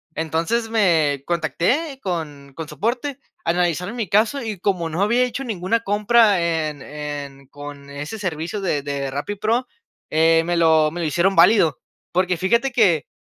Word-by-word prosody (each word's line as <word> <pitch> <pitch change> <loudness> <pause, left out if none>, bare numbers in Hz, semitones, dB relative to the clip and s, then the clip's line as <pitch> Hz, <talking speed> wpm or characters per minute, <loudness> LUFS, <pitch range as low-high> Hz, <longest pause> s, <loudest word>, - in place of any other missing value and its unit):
Entonces 165 +9 -1
me 160 -11 +2
contacté 180 - 0
con 150 -6 -5
con 160 -2 -6
soporte, 240 - -2 0.3
analizaron 175 +4 0
mi 225 -4 -2
caso 220 +8 +2
y 215 -4 -5
como 180 -3 0
no 165 +4 -2
había 235 +5 +3
hecho 250 +2 -4
ninguna 220 -2 -1
compra 210 0 +3
en 160 -4 -1
en 145 -2 -7
con 145 0 -10
ese 145 +9 -6
servicio 175 +1 -3
de 150 -7 -1
de 140 -1 -3
Rappi 145 +9 -3
Pro, 230 +5 0 0.4
eh, 165 +1 +4
me 175 +1 0
lo 160 -2 +4
me 175 - -6
lo 165 - 0
hicieron 175 +6 +1
válido, 165 - +5 0.3
porque 180 0 +1
fíjate 235 +9 +1
que, 215 -9 +4
eh, 150 - -8
175 Hz, 165 wpm, -21 LUFS, 155-215 Hz, 0.4 s, válido